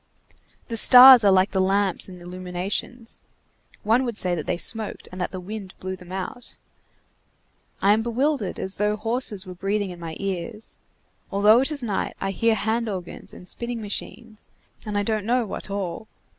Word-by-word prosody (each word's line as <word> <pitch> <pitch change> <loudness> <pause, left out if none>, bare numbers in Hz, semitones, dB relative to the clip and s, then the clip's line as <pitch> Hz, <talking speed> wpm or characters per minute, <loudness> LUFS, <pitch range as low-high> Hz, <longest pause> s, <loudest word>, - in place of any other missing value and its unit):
The 230 - -2
stars 250 +1 +10
are 200 - +5
like 190 +1 +3
the 190 - +1
lamps 195 0 0
in 180 -1 -11
illuminations, 185 +6 -5 0.6
one 225 +5 +2
would 235 -4 -4
say 180 -1 +3
that 155 -4 -4
they 180 - -1
smoked 220 +4 -1
and 185 0 -7
that 180 - -1
the 185 - -7
wind 195 +1 -8
blew 185 0 -5
them 180 -1 -14
out, 195 +6 -7 1.3
I 200 +1 +5
am 220 - +1
bewildered, 240 -1 -1
as 190 - -3
though 210 +1 +1
horses 220 -2 -1
were 185 - -8
breathing 195 +1 -2
in 175 - -10
my 165 -2 -7
ears; 195 +3 -5 0.5
although 210 +3 +5
it 270 - 0
is 285 -4 -1
night, 210 -4 -3
I 195 - -2
hear 225 +3 +1
hand 220 +3 -1
organs 185 -4 -6
and 180 - -13
spinning 235 +3 -5
machines, 215 +1 -7 0.4
and 205 -1 -2
I 205 - +1
don't 215 0 -1
know 240 +2 +1
what 205 - -7
all. 195 +1 -5
205 Hz, 180 wpm, -23 LUFS, 185-230 Hz, 1.3 s, stars